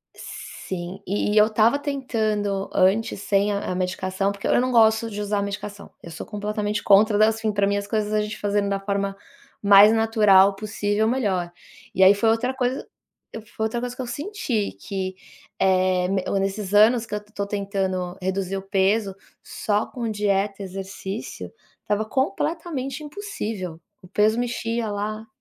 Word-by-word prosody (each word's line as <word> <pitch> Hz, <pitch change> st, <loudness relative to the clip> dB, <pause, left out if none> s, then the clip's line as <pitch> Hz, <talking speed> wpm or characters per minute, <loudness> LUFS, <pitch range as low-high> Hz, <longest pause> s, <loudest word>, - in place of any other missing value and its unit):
sim, 185 Hz, +1 st, -7 dB
e 205 Hz, +2 st, 0 dB
eu 210 Hz, -, +7 dB
estava 225 Hz, +4 st, +3 dB
tentando 215 Hz, -8 st, -1 dB
antes 195 Hz, +2 st, +2 dB
sem 200 Hz, 0 st, +1 dB
a 200 Hz, -2 st, -2 dB
medicação, 185 Hz, +2 st, -1 dB
porque 200 Hz, 0 st, -5 dB
eu -, -, +3 dB
não 255 Hz, +1 st, 0 dB
gosto 225 Hz, -1 st, +4 dB
de 210 Hz, -1 st, -5 dB
usar 205 Hz, 0 st, -1 dB
medicação, 200 Hz, 0 st, -6 dB
eu 170 Hz, -, -9 dB
sou 160 Hz, -, -7 dB
completamente 210 Hz, 0 st, -3 dB
contra 205 Hz, +1 st, +5 dB
das 220 Hz, +1 st, +3 dB
fim 220 Hz, -1 st, 0 dB
pra 200 Hz, -1 st, +1 dB
mim 200 Hz, -, +1 dB
as 200 Hz, 0 st, -4 dB
coisas 215 Hz, 0 st, -1 dB
a 215 Hz, -, +2 dB
gente 210 Hz, 0 st, -4 dB
fazendo 205 Hz, 0 st, 0 dB
da 200 Hz, 0 st, -1 dB
forma 200 Hz, 0 st, -2 dB, 0.5 s
mais 200 Hz, +1 st, +8 dB
natural 210 Hz, -3 st, +5 dB
possível 210 Hz, +1 st, -1 dB
melhor. 200 Hz, -8 st, 0 dB, 0.4 s
E 190 Hz, -, +5 dB
aí 190 Hz, +1 st, +8 dB
foi 205 Hz, +2 st, +1 dB
outra 230 Hz, +3 st, +1 dB
coisa 255 Hz, 0 st, -2 dB, 0.7 s
foi 220 Hz, -, -1 dB
outra 220 Hz, +2 st, -2 dB
coisa 245 Hz, 0 st, -4 dB
que -, -, -5 dB
eu 250 Hz, -, -5 dB
senti 255 Hz, -, -2 dB
que, 190 Hz, -1 st, -4 dB, 0.5 s
eh, 185 Hz, -1 st, +2 dB, 0.3 s
nesses 195 Hz, +1 st, -3 dB
anos 225 Hz, +3 st, +5 dB
que 210 Hz, -, -10 dB
eu 210 Hz, -, -1 dB
tô 205 Hz, -1 st, -5 dB
tentando 195 Hz, -3 st, -2 dB
reduzir 190 Hz, +1 st, -2 dB
o 195 Hz, -, -4 dB
peso, 195 Hz, +1 st, +1 dB, 0.3 s
só 210 Hz, 0 st, -1 dB
com 235 Hz, -3 st, -5 dB
dieta, 205 Hz, -1 st, 0 dB
exercício, 195 Hz, +2 st, -6 dB, 0.3 s
estava 210 Hz, +1 st, -1 dB
completamente 275 Hz, -, -2 dB
impossível. 225 Hz, -, -5 dB, 0.2 s
O 185 Hz, -, -14 dB
peso 210 Hz, +4 st, +2 dB
mexia 235 Hz, -2 st, -2 dB
lá. 215 Hz, +2 st, -4 dB
205 Hz, 160 wpm, -23 LUFS, 195-225 Hz, 0.7 s, mais